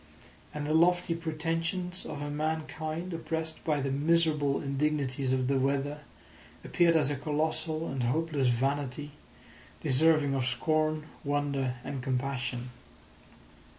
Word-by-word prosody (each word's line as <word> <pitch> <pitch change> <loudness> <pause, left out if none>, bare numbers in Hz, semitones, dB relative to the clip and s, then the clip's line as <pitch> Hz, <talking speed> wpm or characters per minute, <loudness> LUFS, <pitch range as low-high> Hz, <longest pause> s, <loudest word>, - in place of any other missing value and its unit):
And 150 -1 -4
the 155 - 0
lofty 175 +1 +4
pretensions 165 +2 -2
of 145 - -5
a 145 - -3
mankind 155 +3 -3
oppressed 160 0 -3
by 150 -3 +1
the 135 0 -1
miserable 150 -1 +2
indignities 140 -2 0
of 130 -1 +1
the 135 0 +2
weather 140 +2 0 0.7
appeared 170 -1 +4
as 150 -3 +3
a - - 0
colossal 155 +2 -1
and 135 -1 -3
hopeless 145 +2 +1
vanity 140 +3 0 0.7
deserving 150 0 +3
of 130 -2 0
scorn, 155 +4 +1 0.2
wonder, 140 -3 0
and 135 -2 -4
compassion. 125 -2 -2
150 Hz, 120 wpm, -30 LUFS, 135-160 Hz, 0.7 s, lofty